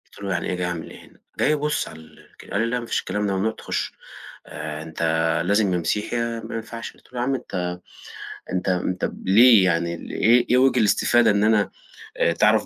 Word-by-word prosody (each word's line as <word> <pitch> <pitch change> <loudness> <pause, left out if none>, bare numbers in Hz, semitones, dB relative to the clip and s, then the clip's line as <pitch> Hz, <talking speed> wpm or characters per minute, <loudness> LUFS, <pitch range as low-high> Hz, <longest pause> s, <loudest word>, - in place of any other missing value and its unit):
قُلت - - -14
له: 100 - -3
"يعني 85 - -2
إيه - - -1
جاي 90 0 -2
أعمل 85 -2 -5
إيه - - -13
هنا؟" - - -23 0.2
جاي 150 - +3
أبُص 150 0 -1
على 80 - -11
الك 80 - -17
قال 105 - 0
لي: 115 - +1
"لأ، 125 +1 -1
ما 120 - -7
فيش - - -1
الكلام 105 +2 -2
ده 100 - 0
ممنوع 110 +4 0
تخُش، - - -4 0.5
آآ 80 0 -6
أنت 80 0 -8 0.4
لازم 100 -1 +2
يا - - +2
مسيحي 105 +7 -2
يا 115 -1 -2
ما - - -6
ينفعش،" 115 +1 -6
قُلت - - -25
له: 125 - -4
"يا 120 - 0
عم 135 +1 0
أنت 90 -7 -4 0.8
أنت 90 +1 -2
أنت 90 0 -1
ليه 110 +1 +7
يعني 85 -1 +1 0.2
إيه 120 +2 +4
إيه 125 - +5
وِجِه 130 -1 +4
الإستفادة 115 +2 +3
إن 100 0 +2
أنا 110 -2 +3 0.5
آآ - - +2
تعرَف - - +3
105 Hz, 220 wpm, -23 LUFS, 90-115 Hz, 0.8 s, ليه